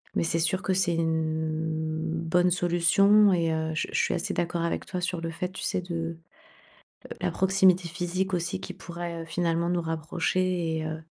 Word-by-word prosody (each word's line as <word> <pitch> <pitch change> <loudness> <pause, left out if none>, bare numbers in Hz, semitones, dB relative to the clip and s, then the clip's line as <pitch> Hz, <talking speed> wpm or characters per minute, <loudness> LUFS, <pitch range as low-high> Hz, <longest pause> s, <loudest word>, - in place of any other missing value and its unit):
Mais - - +2
c'est 165 0 0
sûr 175 +3 +1
que 190 - 0
c'est 175 -2 +1
une 160 -1 -1
bonne 165 +2 +1
solution. 185 +4 +4
Et 165 -2 +1
heu, 160 0 -1
je - - -1
je - - +1
suis - - +1
assez 170 - -2
d'accord 170 0 -1
avec 170 - -1
toi 180 -1 -4
sur 180 -1 -2
le 165 0 -3
fait, 180 +2 -3
tu - - -7
sais, 180 - 0
de, 175 -1 -5
heu, 165 0 -4 1.0
la - - 0
proximité 190 -2 +3
physique 180 +3 -2
aussi 175 0 -1
qui - - -6
pourrait, 170 -1 -6
heu, - - -10
finalement 170 0 0
nous 175 -1 +1
rapprocher 165 +1 -1
et 155 - -3
heu 160 0 -5
170 Hz, 195 wpm, -27 LUFS, 160-180 Hz, 1.0 s, solution